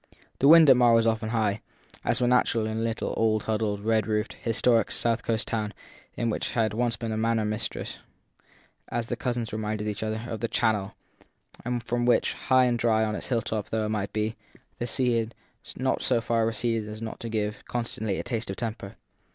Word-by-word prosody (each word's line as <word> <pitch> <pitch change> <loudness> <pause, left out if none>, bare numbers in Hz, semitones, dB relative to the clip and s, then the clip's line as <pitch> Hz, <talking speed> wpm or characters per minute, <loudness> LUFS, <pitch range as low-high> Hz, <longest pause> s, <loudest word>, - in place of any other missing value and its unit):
The 135 - +4
wind 160 +1 +9
at 135 - +9
Marr 120 -2 +5
was 115 0 +4
often 110 -1 0
high, 110 -3 0 0.4
as - - +1
was 125 - +2
natural 120 -2 +3
in 110 0 -2
a - - -1
little 115 0 -2
old 110 -1 +2
huddled, 105 -2 -1
red 110 -1 +1
roofed, 105 0 -1
historic 115 0 +2
south 115 0 0
coast 110 -2 -1
town 110 -2 -2 0.4
which 115 -2 -1
had 110 -3 +1
once 115 0 0
been 115 -1 -4
in - - -1
a - - -2
manner 115 -1 +1
mistress, 105 +1 -4 0.9
as 120 - -1
the - - -3
cousins 120 -3 -3
reminded 105 0 -2
each 105 -1 -3
other, 110 +1 -3
of 115 - -4
the 115 - -1
Channel, 110 -4 0 0.7
and 120 0 -2
from 120 0 -1
which, 120 - +3
high 130 -1 +3
and 120 -1 +1
dry 110 -1 +3
on 110 - -2
its - - -6
hilltop 110 -3 -1
though 110 -1 0
it - - -2
might 105 -2 -2
be, 110 +1 -1 0.4
the 120 - -2
sea 125 -1 +1
had 115 +1 -4 0.4
not 130 +1 0
so 125 -2 +2
far 115 -1 +1
receded 115 -1 -1
as 105 0 -7
not 110 - -6
to 115 - -5
give, 105 -1 -2
constantly, 110 -4 -2
a - - -3
taste 120 -3 -3
of 95 - -3
temper. 110 -2 -5
115 Hz, 210 wpm, -27 LUFS, 110-120 Hz, 0.9 s, wind